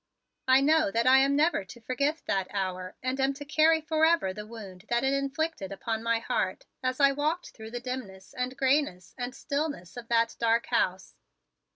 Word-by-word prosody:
I 260 +1 +6
know 310 +2 +4
that 230 -2 0
I 260 +1 +7
am 275 +1 +3
never 305 - +2
to 190 +5 -12
forget 280 +6 -1
that 190 -1 0
hour 185 -2 -3
and 255 +1 -1
am 270 +1 +1
to 290 +1 -8
carry 315 +2 +4
forever 315 - +2
the 210 +2 -8
wound 200 -4 -10
that 240 +1 +1
it 265 +1 +2
inflicted 275 - -2
upon 220 +3 -3
my 230 0 +1
heart - - -2 0.2
as 255 +1 -1
I 275 -1 +6
walked 305 +5 -2
through 220 -1 -10
the 245 +1 -5
dimness 245 -7 -7
and 250 +1 -3
grayness 265 -10 +1
and 250 0 -5
stillness 280 - -3
of 235 -1 -8
that 230 -1 +2
dark 230 0 +2
house. 185 +1 0
255 Hz, 190 wpm, -28 LUFS, 220-290 Hz, 0.2 s, I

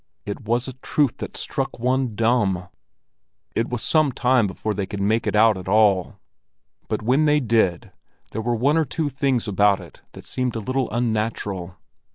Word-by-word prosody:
It 100 +4 -5
was 120 +3 0
a 130 - -6
truth 135 +1 0
that - - -6
struck - - -3
one 125 -1 0
dumb! 105 -6 +1 0.9
It 115 - 0
was 120 -2 -3
some 155 -3 +3
time 125 -3 +2
before 105 +3 -3
they 100 -1 -3
could 100 - -5
make 110 +3 +1
it - - 0
out 110 -2 +5
at 90 - -10
all, 100 -3 +3 0.7
but - - -2
when 130 +7 +3
they 150 0 +4
did 110 -9 +1 0.4
there 110 - -3
were 120 +1 0
one 140 +7 +2
or 160 - +2
two 150 +2 -2
things 135 -4 0
about 100 0 +3
it 90 -4 -14
that - - -12
seemed 125 -2 -2
a - - -1
little 130 +4 -1
unnatural. 105 -6 -2
115 Hz, 185 wpm, -23 LUFS, 105-130 Hz, 0.9 s, out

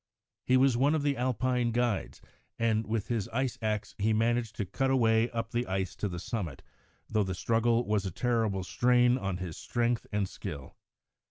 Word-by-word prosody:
He 130 - +5
was 130 -1 +4
one 140 +6 +3
of 150 - 0
the 145 -1 +1
Alpine 125 0 0
guides, 120 -3 -1 0.3
and, 115 -1 +1
with 110 -1 -1
his 115 -5 -1
ice 130 +1 -2
axe, 110 -1 -2
he 110 +2 +2
managed 115 0 +1
to 105 - -2
cut 135 +9 -1
a 135 - +3
way 115 0 +3
up 115 -1 -4
the 120 +1 -1
ice 95 -1 -2
to 105 - -2
the 85 - -5
summit, 85 - -4 0.4
though 110 -1 +1
the 95 -1 -3
struggle 115 +4 +2
was 105 -2 +1
a 95 - -2
terrible 110 -3 0
strain 125 +5 +3
on 95 -5 -2
his 90 -3 -6
strength 120 -1 -1
and 105 -2 0
skill. 70 -6 -8
115 Hz, 190 wpm, -30 LUFS, 105-120 Hz, 0.4 s, He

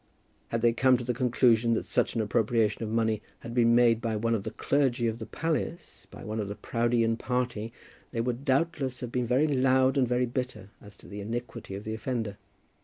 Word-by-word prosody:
Had 115 0 -2
they 120 -1 +5
come 130 +1 +4
to 120 - -5
the 125 +1 -1
conclusion 120 -2 +3
that - - -2
such - - 0
an 115 - +1
appropriation 110 0 +1
of 110 - -3
money 110 -1 +1 0.2
had 115 - -7
been 115 -1 +4
made 120 -2 +4
by 115 -2 -1
one 115 +2 0
of 110 - 0
the - - -4
clergy 130 -4 +1
of 115 0 -1
the 110 - -6
palace, 165 +1 -3
by - - -11
one 110 0 -4
of 105 - -2
the 100 - -5
Proudeian 115 0 +1
party, 120 -3 -2 0.4
they 115 - -4
would 120 +2 -2
doubtless 135 -2 0
have 125 -2 -5
been 125 -1 -1
very 130 +6 +3
loud 130 -1 +3
and 130 - +3
very 125 +1 +1
bitter 125 -5 -5
as 105 0 -13
to - - -16
the 100 0 -7
iniquity 115 -1 -5
of 100 - -7
the 110 - -4
offender. 110 -3 -3
120 Hz, 215 wpm, -28 LUFS, 110-125 Hz, 0.4 s, they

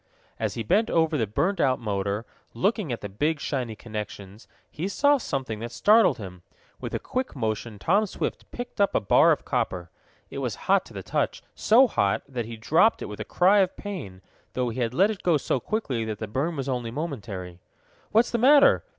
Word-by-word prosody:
As - - -2
he 115 - -3
bent 215 - +2
over 160 -1 +2
the 115 -7 0
burned 170 - 0
out 130 -2 +3
motor, 100 0 -2 0.3
looking 200 - 0
at 120 - -4
the 105 - -4
big 150 +11 -1
shiny 125 -6 -3
connections, 105 -2 -8 0.2
he 165 +5 -3
saw 285 +7 +3
something 130 - -3
that 115 +1 -6
startled 215 - +4
him. 90 -4 -9 0.4
With - - -5
a - - -1
quick 255 -6 -4
motion 110 -2 -3
Tom 200 - +2
Swift - - -4
picked 245 -4 -5
up 200 - +2
a - - +4
bar 100 - +5
of - - -1
copper. 90 -2 -2 0.4
It - - -5
was - - -2
hot - - +3
to - - -14
the - - -6
touch - - -2
so 240 +5 +5
hot 100 - 0
that 125 -4 -4
he 115 0 -8
dropped 165 - +3
it - - -6
with 105 - -8
a - - -2
cry 190 +3 +3
of 190 -2 +1
pain, 100 - -7 0.3
though 125 -1 -1
he 115 +3 -5
had 120 0 -1
let 200 +4 +2
go 170 -4 +3
so 135 - -1
quickly 135 - -2
that 110 -1 -4
the 110 - -5
burn 140 +10 -2
was 135 -2 -4
only 125 -3 -2
momentary. 105 - -6 0.5
"What's 230 +3 +3
the 235 - 0
matter?" 280 +4 +6
130 Hz, 205 wpm, -26 LUFS, -, 0.5 s, matter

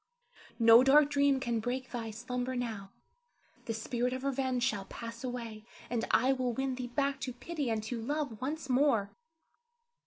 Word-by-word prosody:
no 230 +1 +8
dark 290 +2 +6
dream 280 -1 +3
can 235 -3 -1
break 255 +3 -3
thy 230 -2 -4
slumber 250 +3 -3
now; 220 -5 -4 0.8
the 225 - -2
spirit 245 +2 -1
of 260 0 -4
revenge 260 -2 0
shall 205 -7 0
pass 230 +3 -8
away, 235 -4 -5 0.3
and 235 -2 0
I 255 +4 +4
will 255 -2 -1
win 265 +2 -1
thee 250 -1 -4
back 275 +2 -1
to 260 -2 -3
pity 290 +1 -4
and 220 -1 -1
to 230 +1 -4
love 285 -2 -3
once 295 +3 -3
more. 250 -6 +2
250 Hz, 165 wpm, -32 LUFS, 230-270 Hz, 0.8 s, no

